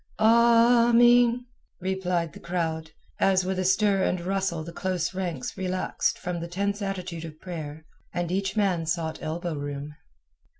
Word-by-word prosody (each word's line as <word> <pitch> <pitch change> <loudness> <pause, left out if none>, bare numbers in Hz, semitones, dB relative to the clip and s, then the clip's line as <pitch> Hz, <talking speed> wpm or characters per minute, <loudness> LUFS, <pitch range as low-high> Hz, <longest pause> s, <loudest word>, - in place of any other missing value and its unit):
"Ameen," 235 +1 +5 0.3
replied 180 -4 -1
the - - -11
crowd, 160 -2 -3 0.3
as 190 -1 +3
with 190 0 -1
a - - +1
stir 195 +1 +3
and 185 -1 +1
rustle 185 -2 -1
the 170 +1 -9
close 185 -1 -2
ranks 175 -8 -4
relaxed 185 -1 -1
from 180 -1 -4
the 170 - -5
tense 200 +4 -2
attitude 185 -4 -4
of 155 -1 -9
prayer, 160 -3 -7 0.3
and 175 -1 -2
each 195 +3 -1
man 185 -6 +1
sought 160 -1 -2
elbow 165 +2 -3
room. 145 0 -5
185 Hz, 145 wpm, -26 LUFS, 165-195 Hz, 0.3 s, Ameen